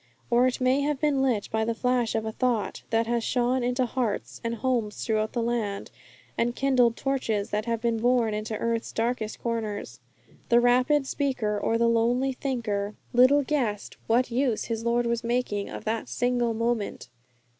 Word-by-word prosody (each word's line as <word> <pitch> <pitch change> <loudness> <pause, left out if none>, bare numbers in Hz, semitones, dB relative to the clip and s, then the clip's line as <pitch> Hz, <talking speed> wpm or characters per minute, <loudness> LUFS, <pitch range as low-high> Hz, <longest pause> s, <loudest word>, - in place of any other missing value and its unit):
Or 245 +2 +5
it 255 - -2
may 255 +2 +2
have 290 -1 -1
been 290 -2 +2
lit 245 -7 +1
by 220 0 +1
the 230 +1 -1
flash 250 -1 0
of 220 0 -1
a 220 - -2
thought 240 -2 -1
that 225 0 +2
has 235 0 0
shone 250 +2 +1
into 250 +1 +1
hearts 240 -3 -3
and 230 0 -2
homes 235 -4 -1
throughout 215 -1 0
the 235 - 0
land, 225 -4 -2 0.4
and 240 +1 0
kindled 255 -4 +3
torches 230 -7 -1
that 210 +1 -1
have 230 -1 -1
been 230 -1 +1
borne 240 -2 +2
into 215 +1 -3
earth's 230 0 -2
darkest 225 -1 -2
corners. 215 - -3 0.5
The 235 - +6
rapid 255 +4 +3
speaker 260 -7 -1
or 215 +2 0
the 235 0 +3
lonely 240 +3 +2
thinker 220 -6 -2 0.2
little 260 +4 +6
guessed 245 -8 -2
what 245 +2 +2
use 245 -2 +1
his 225 -1 -3
Lord 235 +1 +1
was 235 0 -1
making 235 -4 -1
of - - -8
that 220 0 -2
single 245 -2 0
moment. 230 - -2
235 Hz, 175 wpm, -26 LUFS, 220-250 Hz, 0.5 s, The